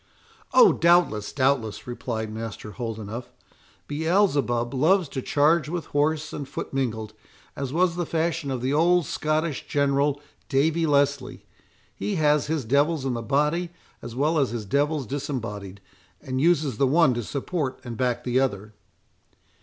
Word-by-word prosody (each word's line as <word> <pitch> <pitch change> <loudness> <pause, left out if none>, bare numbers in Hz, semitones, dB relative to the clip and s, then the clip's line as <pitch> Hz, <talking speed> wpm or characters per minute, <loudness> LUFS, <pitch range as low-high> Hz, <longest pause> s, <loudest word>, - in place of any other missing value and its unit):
"Oh! 485 -4 +7
doubtless, 170 -12 +3
doubtless," 130 -6 0
replied 115 -3 -4
Master 110 -1 -6
Holdenough; 115 0 -5 0.6
"Beelzebub 145 -7 +1
loves 165 +6 +3
to 130 - -4
charge 150 +3 +2
with 170 0 -3
horse 155 +1 0
and 145 -2 -6
foot - - -6
mingled, 110 -5 -2 0.4
as 135 -2 -4
was 170 +2 +2
the 175 -2 -2
fashion 165 -2 -1
of 130 -2 -3
the 130 +2 0
old 175 +2 +3
Scottish 155 -1 -2
general, 140 0 +1 0.3
Davie 160 +4 +2
Leslie. 140 -2 0 0.5
He 100 +2 -3
has 150 -2 +2
his 155 -5 -1
devils 140 +4 +2
in 130 - 0
the 120 - -3
body 150 +9 0 0.3
as 120 0 -8
well 155 +4 +1
as 135 - +2
his 115 -2 -5
devils 145 +4 0
disembodied, 115 - -5 0.4
and 130 0 -3
uses 150 -7 +2
the 135 - +3
one 150 -1 +4
to 120 - -2
support 140 - -3
and 120 -2 -6
back 120 0 -1
the 125 +1 +1
other." 110 -5 -2
140 Hz, 150 wpm, -25 LUFS, 120-155 Hz, 0.6 s, Oh